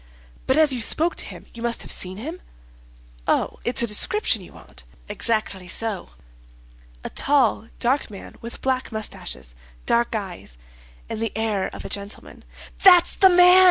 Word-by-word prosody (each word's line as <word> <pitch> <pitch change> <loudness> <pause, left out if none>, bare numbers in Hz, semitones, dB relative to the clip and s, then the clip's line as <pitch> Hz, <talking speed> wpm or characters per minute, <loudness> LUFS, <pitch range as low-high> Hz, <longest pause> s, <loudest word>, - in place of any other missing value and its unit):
"But 260 - +3
as 310 -3 +5
you 245 - -2
spoke 325 +9 +2
to - - -2
him - - -10
you 235 - -10
must 235 0 -1
have - - -7
seen 185 +1 -2
him." 320 - -7 0.9
"Oh, - - 0
it's 240 0 0
a - - +4
description 225 - +2
you 180 - -13
want?" - - -13 0.2
"Exactly 215 -5 -1
so." 215 +2 -3 0.9
"A - - -6
tall, 265 -6 +2
dark 265 +3 0
man, 200 -2 -11
with 235 +1 -8
black 260 -1 -1
mustaches, 65 - -5 0.3
dark 235 0 +2
eyes, 185 - -6 0.5
and 215 - -5
the 225 - -1
air 215 -3 0
of - - -9
a - - -3
gentleman." 200 +1 -6 0.4
"That's 360 -2 +7
the 380 - +7
man!" 360 +1 +8
230 Hz, 160 wpm, -23 LUFS, 205-280 Hz, 0.9 s, man